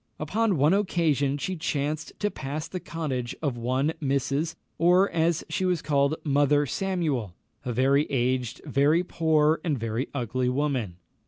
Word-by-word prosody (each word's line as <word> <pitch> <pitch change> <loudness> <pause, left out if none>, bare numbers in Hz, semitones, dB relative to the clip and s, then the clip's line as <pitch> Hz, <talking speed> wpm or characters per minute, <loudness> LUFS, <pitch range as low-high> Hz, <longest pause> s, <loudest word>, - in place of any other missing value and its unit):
Upon 205 +5 +1
one 150 +5 +4
occasion 160 -8 +1
she 185 +6 -3
chanced 155 -1 -2
to 205 0 +1
pass 145 +3 -5
the 185 - -5
cottage 135 -9 -4
of 140 -6 -1
one 130 +6 0
Mrs., 140 +3 0 0.2
or, 180 +4 +4
as 165 0 +1
she - - -2
was 180 -3 0
called, 140 0 +2
Mother 145 0 +3
Samuel, 150 - -2 0.3
a 125 - -3
very 135 +4 +3
aged, 125 -2 -1
a - - -8
very 150 +5 +3
poor, 160 -2 +2
and 160 -4 0
a - - -6
very 115 +3 -2
ugly 125 -1 -1
woman. 125 -9 -1
145 Hz, 160 wpm, -26 LUFS, 130-165 Hz, 0.3 s, one